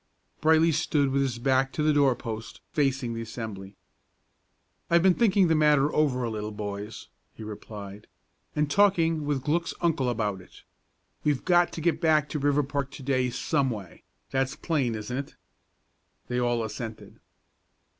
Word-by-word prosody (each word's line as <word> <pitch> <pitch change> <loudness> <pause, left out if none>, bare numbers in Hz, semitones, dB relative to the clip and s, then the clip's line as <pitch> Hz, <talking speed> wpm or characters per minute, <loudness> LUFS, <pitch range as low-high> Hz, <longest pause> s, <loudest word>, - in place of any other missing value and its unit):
Brightly 160 +1 +5
stood 150 -3 +1
with 140 +1 +2
his 130 -3 -1
back 135 +2 +2
to 150 - -1
the 155 0 +3
doorpost, 120 -6 0
facing 135 -4 0
the 115 - -4
assembly. 110 -4 -7 1.1
"I've 170 0 +4
been 190 -1 +6
thinking 195 -3 +3
the 165 - +3
matter 150 -2 +3
over 135 -5 +2
a 120 - -1
little, 105 -1 -4
boys," 105 +1 -6 0.3
he 110 - -9
replied, 105 -1 -9 0.5
"and 150 0 +1
talking 165 -4 +3
with 140 -3 -1
Glück's 165 +3 0
uncle 155 -7 +1
about 105 -5 -2
it. - - -17 0.6
We've 145 -3 0
got 175 -1 +4
to 165 - -5
get 170 +2 +1
back 155 -3 +3
to 150 - -3
Riverpark 140 -1 0
to 140 - -10
day 130 -1 +1
some 140 +2 0
way; 100 -7 -7 0.3
that's 135 0 0
plain, 135 -9 -1
isn't 110 +3 -5
it?" 140 - -6 0.9
They 125 0 0
all 120 -1 +1
assented. 110 0 -7
135 Hz, 155 wpm, -27 LUFS, 115-155 Hz, 1.1 s, been